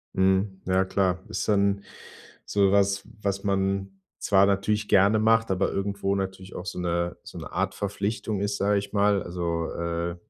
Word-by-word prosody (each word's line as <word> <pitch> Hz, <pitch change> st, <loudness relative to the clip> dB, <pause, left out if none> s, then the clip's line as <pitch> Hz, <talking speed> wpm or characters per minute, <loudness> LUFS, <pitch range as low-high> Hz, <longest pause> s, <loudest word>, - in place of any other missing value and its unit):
Mhm. 95 Hz, +1 st, +1 dB
Ja, 95 Hz, +1 st, +2 dB
klar. 95 Hz, -1 st, +1 dB
Ist -, -, -3 dB
dann 100 Hz, -1 st, +2 dB, 0.6 s
so 100 Hz, -1 st, +2 dB
was, 100 Hz, 0 st, +2 dB, 0.2 s
was 100 Hz, -1 st, -2 dB
man 95 Hz, 0 st, -1 dB, 0.2 s
zwar 100 Hz, 0 st, +4 dB
natürlich 105 Hz, +2 st, 0 dB
gerne 100 Hz, +3 st, +5 dB
macht, 115 Hz, 0 st, +3 dB
aber 95 Hz, 0 st, +1 dB
irgendwo 100 Hz, 0 st, -1 dB
natürlich 95 Hz, -1 st, -5 dB
auch 90 Hz, -, -7 dB
so 95 Hz, -, -5 dB
'ne 85 Hz, 0 st, -1 dB
so -, -, -10 dB
'ne -, -, -8 dB
Art -, -, -1 dB
Verpflichtung 100 Hz, +1 st, -2 dB
ist, 100 Hz, 0 st, -1 dB
sage 100 Hz, +1 st, +2 dB
ich 100 Hz, -, -6 dB
mal. 100 Hz, -1 st, +3 dB
Also, 85 Hz, -2 st, -3 dB
äh, 85 Hz, 0 st, -3 dB
100 Hz, 170 wpm, -26 LUFS, 95-100 Hz, 0.6 s, gerne